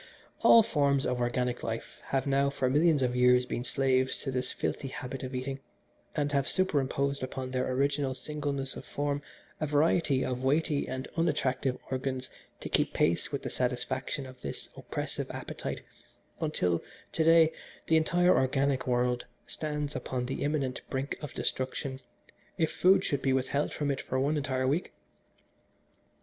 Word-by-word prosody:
"All 230 - +8
forms 140 -8 +2
of 125 -1 0
organic 125 0 0
life 115 0 -5
have 135 -1 0
now 140 0 +3
for 135 -2 0
millions 150 -1 +4
of 125 -1 0
years 125 0 +5
been 120 - -3
slaves 130 0 +1
to 135 - -2
this 125 0 -2
filthy 135 - -2
habit 130 0 -6
of 130 0 -5
eating, 135 +2 -3 0.6
and 145 -1 0
have 140 -1 +1
superimposed 140 -6 +1
upon 130 0 -4
their 130 0 0
original 140 0 +1
singleness 140 -1 -3
of - - -7
form 145 0 -2 0.4
a 155 - 0
variety 145 -2 +3
of 125 0 -3
weighty 145 +1 +1
and 130 0 -4
unattractive 135 -5 +1
organs 130 0 -2 0.3
to - - -4
keep - - +1
pace 85 +10 +1
with 140 - -3
the - - -4
satisfaction 130 +2 -2
of 130 -1 -12
this - - -6
oppressive - - -4
appetite, - - -5 0.6
until 90 - +1 0.3
to 160 - +1
day 165 0 +6 0.3
the 160 - +3
entire 175 +3 +4
organic 135 0 +1
world 125 0 +1 0.2
stands 150 -2 -3
upon 125 -1 -2
the 130 - -4
imminent 140 -3 -1
brink 135 +1 -2
of 150 - -7
destruction 130 +1 -2 0.6
if 160 -1 +1
food 185 +2 +4
should 140 -2 0
be 135 - +2
withheld 135 +2 0
from 145 -1 -1
it 135 - -2
for 130 - -2
one 145 +3 +2
entire 130 -3 0
week. 150 +7 0
135 Hz, 160 wpm, -30 LUFS, 130-145 Hz, 0.6 s, All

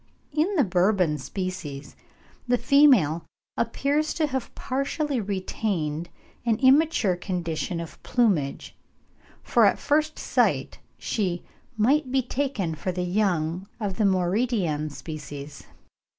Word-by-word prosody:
In 315 +7 +1
the 300 - +4
Bourbon 180 -5 +2
species 160 -4 -5 0.5
the 245 0 +3
female 240 - +5 0.3
appears 285 +6 0
to 320 - +2
have 265 -4 -4
partially 275 0 -1
retained 185 -5 -2 0.3
an 230 -2 +2
immature 265 - +4
condition 175 -2 -3
of 165 -1 -8
plumage, 195 - 0 0.7
for - - +3
at - - +5
first 310 +1 +1
sight - - 0 0.2
she 180 -5 -2 0.3
"might 260 +5 +2
be 265 -1 +2
taken 245 - -2
for 170 +4 -3
the 180 0 -2
young 180 -2 0
of 200 -4 -3
the 215 - +2
Mauritian 185 -4 +1
species." 145 -1 -8
195 Hz, 115 wpm, -25 LUFS, 170-260 Hz, 0.7 s, female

